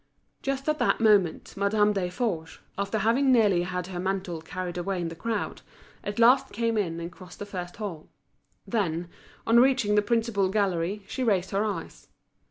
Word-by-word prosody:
Just 275 +1 -2
at 305 0 +1
that - - +2
moment 205 -7 +3
Madame 210 +1 +2
Desforges, 180 -3 -2 0.2
after 200 +2 -1
having 240 +6 +3
nearly 210 -8 +4
had 180 0 -3
her 180 -1 -6
mantle 185 -3 -2
carried 175 +2 -5
away 180 +1 -2
in 170 -1 -2
the 165 - -8
crowd, 225 +5 -3 0.4
at 205 - -4
last 245 +3 +5
came 230 +1 0
in 170 -6 -1
and 170 +1 -5
crossed 180 0 -13
the 205 - -6
first 180 -3 -6
hall. 190 -8 -6 0.6
Then, 175 -6 -1 0.4
on 230 +1 +5
reaching 255 -5 +3
the 210 - +5
principal 220 -3 +1
gallery, 195 -1 0
she 260 - -3
raised 190 -6 +1
her 200 +2 +1
eyes. 210 -2 -5
200 Hz, 175 wpm, -27 LUFS, 180-225 Hz, 0.6 s, last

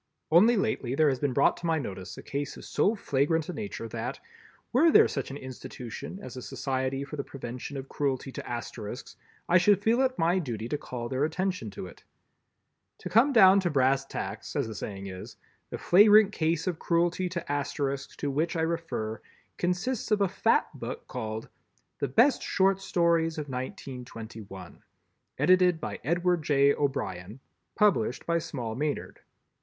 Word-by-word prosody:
Only 215 +8 +6
lately 190 - -1
there 155 0 +4
has 130 -2 -1
been 145 -2 0
brought - - +3
to 170 - -4
my 165 -1 +2
notice 95 -8 -6
a - - -9
case 140 0 -4
of - - -10
so 215 - +1
flagrant 155 -2 0
a - - -3
nature 200 - -5
that, 120 +4 -4 0.5
were 305 +7 +6
there - - +7
such 135 - -4
an 140 - -6
institution 130 +4 -8
as - - -8
a 130 - -6
Society 135 +1 -2
for 150 +2 -7
the 140 - -2
Prevention 125 +1 -7
of 135 0 -6
Cruelty 135 -2 -2
to - - -7
Asterisks, 120 0 -6 0.3
I 180 +1 +5
should 195 +2 +4
feel 230 +4 +3
it 260 -1 +1
my 170 +3 +2
duty 115 - -4
to 150 - -1
call 120 -4 -5
their 130 +3 -1
attention 180 - -1
to - - -5
it. 90 - -13 0.9
To 180 - -7
come 230 - +5
down 195 -5 +7
to 185 -2 0
brass 135 -2 +2
tacks, 135 - -6
as - - 0
the 110 - -6
saying 100 -2 -6
is, 95 -1 -8 0.3
the - - -5
flagrant 210 +2 +6
case 165 -4 0
of 180 -4 -2
cruelty 175 +2 +1
to 170 -4 -4
Asterisks, 140 -1 -2
to 145 - -2
which 160 +5 0
I 165 - 0
refer, 160 -10 -2 0.4
consists 180 +9 -1
of 210 -2 +2
a 200 - +4
fat - - +2
book, - - -7
called 110 -2 -5 0.5
"The 140 - 0
Best 235 - +4
Short 195 +1 +2
Stories 170 -3 +1
of 150 -2 -5
1921." 115 -7 -8 0.6
Edited 180 -2 +4
by - - -5
Edward 175 +1 +1
J. 140 -1 +4
O'Brien—Published 130 - -1
by 170 0 +1
Small 130 -9 -5
Maynard. 145 +5 -3
145 Hz, 170 wpm, -28 LUFS, 125-180 Hz, 0.9 s, there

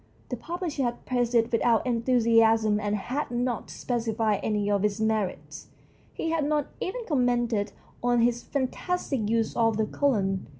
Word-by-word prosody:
The - - -2
publisher 340 -4 -4
had 240 -2 -2
praised 245 -1 0
it 230 -1 +3
without 230 0 +2
enthusiasm 230 -3 +3
and 205 0 -1
had 255 +8 -3
not 240 0 -2
specified 225 -3 -1
any 210 -1 0
of 205 -1 +1
its 210 0 0
merits; 220 -3 -2 0.4
he 325 - -3
had 325 -2 +1
not 295 0 +1
even 485 +7 -3
com 280 -6 +2
mented 235 -4 0 0.3
on 245 -1 +2
his 240 0 +2
fantastic 275 - -2
use 225 -1 0
of 225 -2 +2
the 220 - +2
colon. 200 -8 0
235 Hz, 160 wpm, -27 LUFS, 220-255 Hz, 0.4 s, it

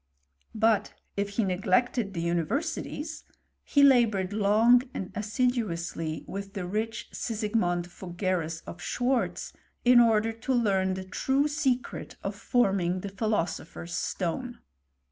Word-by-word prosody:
But 220 -1 +2 0.2
if 200 0 -1
he 230 - +3
neglected 195 +3 +1
the 170 0 -2
univer 170 -2 0
sities, 315 -1 -5 0.4
he 285 - +3
laboured 220 -8 +4
long 220 +4 +5
and 185 - -4
assiduously 205 -8 -1
with 195 0 -6
the 190 -3 -4
rich 215 +5 -3
Sigismond 210 -6 -1
Fuggerus, 175 -2 -3
of 170 - -9
Schwartz, 245 +6 -1 0.3
in 245 0 +8
order 225 -1 +4
to 230 +4 -3
leant 190 -5 +2
the 190 - -5
true 265 +9 +1
secret 265 -4 -1
of 195 - -2
forming 195 -5 +1
the 200 - -5
philosopher's 185 -5 -2
stone. 235 +8 -3
205 Hz, 125 wpm, -28 LUFS, 185-240 Hz, 0.4 s, in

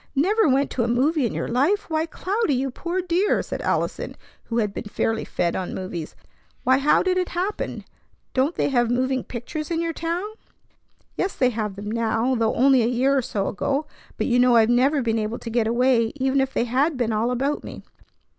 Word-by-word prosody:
"Never 380 +6 +3
went 275 +2 +2
to 245 - 0
a - - 0
movie 265 +3 +2
in - - -5
your - - -2
life! 300 - +1
Why, 315 0 -1
Cloudy, 380 - -1
you 265 +1 -1
poor 350 +7 -3
dear!" 365 +4 +1
said - - -5
Allison, - - -2 0.3
who 230 - -3
had 210 -3 0
been - - -6
fairly 225 +2 -1
fed 170 - -1
on 185 - -3
movies. 175 -4 -6 0.5
"Why, 260 +1 +4
how 285 +2 +3
did 370 0 +1
it 365 - -1
happen? 370 +4 -3 0.5
Don't 275 +6 +1
they - - +1
have 240 -3 +2
moving 255 +1 0
pictures 290 +6 -6
in 330 -1 -1
your 335 0 -1
town?" 335 +4 -2 0.9
"Yes, 380 - -1
they 255 -1 +2
have 210 -3 -3
them 205 +1 -6
now, 230 +2 0
though 230 -3 +1
only 265 0 +5
a 225 - +2
year 255 +3 +2
or 270 - +3
so 210 -5 -2
ago. 275 +9 -1 0.3
But - - -1
you 245 -1 +2
know 250 -1 +5
I've 225 0 +5
never 270 +3 +3
been 225 -1 0
able 215 +2 -2
to 230 - -7
get 230 -1 +1
away, 235 -1 +2
even 270 0 +1
if 265 0 -1
they - - 0
had 265 +5 +1
been 235 -3 0
all 220 +3 +1
about 270 +4 -1
me. - - -9
255 Hz, 210 wpm, -23 LUFS, 230-305 Hz, 0.9 s, only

